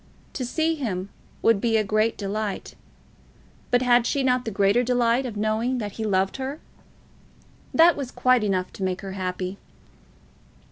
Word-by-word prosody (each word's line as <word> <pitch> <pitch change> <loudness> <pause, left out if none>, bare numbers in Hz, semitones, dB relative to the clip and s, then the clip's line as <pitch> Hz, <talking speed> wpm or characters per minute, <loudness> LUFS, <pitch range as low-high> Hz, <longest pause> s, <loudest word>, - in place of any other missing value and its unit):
To 260 - -3
see 315 +6 0
him 200 - -3 0.3
would 225 -3 +4
be 225 -2 +2
a 215 - +2
great 215 +2 +1
delight. 205 0 -4 1.0
But 245 +1 +3
had 240 -1 +4
she 280 - 0
not 250 -1 +1
the - - -1
greater 200 +3 +3
delight 245 +1 +1
of 220 -4 -7
knowing 220 +4 0
that 210 -4 -4
he 220 - -6
loved 195 -1 0
her? 270 +3 -4 1.1
That 335 +1 +6
was 275 -4 -4
quite 255 -3 +2
enough 185 -3 -1
to 195 - -6
make 185 0 -1
her 195 - -6
happy. 185 0 -4
225 Hz, 160 wpm, -24 LUFS, 200-250 Hz, 1.1 s, That